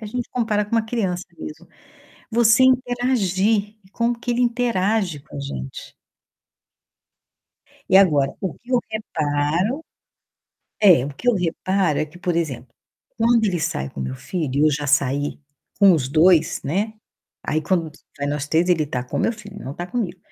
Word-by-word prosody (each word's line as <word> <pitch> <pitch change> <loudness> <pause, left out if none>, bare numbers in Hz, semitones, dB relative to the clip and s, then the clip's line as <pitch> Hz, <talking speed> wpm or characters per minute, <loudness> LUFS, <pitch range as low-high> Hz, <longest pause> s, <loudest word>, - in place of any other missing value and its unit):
a 215 - -7
gente 245 +3 -4
compara 220 -4 0
com 210 - -17
uma 225 -1 +3
criança 195 -6 -2
mesmo, 155 +3 -9 0.6
você 230 +2 +5
interagir 225 -5 +1
e 190 - -23
como 235 +1 -1
que 245 - -4
ele 240 - 0
interage 220 - 0
com 155 - -17
a - - -4
gente. 65 - -7 2.0
E 190 - +7
agora, 145 -8 +3
o 190 -3 -3
que 245 +3 -14
eu 250 - +4
reparo 170 - -1 1.0
é, 175 -11 +7
o - - -5
que 245 - -3
eu 245 - +5
reparo 180 -2 0
é - - +1
que, 155 +3 -15
por 175 -1 -1
exemplo, 130 -7 -3 0.5
quando 230 0 +3
ele 180 -5 0
sai 70 - -2
com 70 - -8
meu 65 0 -4
filho, 160 -8 -4
e - - +2
eu - - +4
já 145 0 -2
saí 140 0 +1 0.4
com 200 -2 +7
os 140 -6 0
2, 165 +3 +4
né. 200 +10 -1 0.5
Aí, 155 +1 0
quando 165 0 0
s 155 - -19 0.2
vai 140 - -2
nós 145 0 -3
3, 165 +3 +2
ele 165 -4 +3
tá 125 -3 -3
com 125 - -4
meu - - +1
filho, 205 -2 -11
não 135 - -5
tá 175 - -5
comigo. 190 -3 -3
185 Hz, 175 wpm, -22 LUFS, 150-220 Hz, 2.0 s, E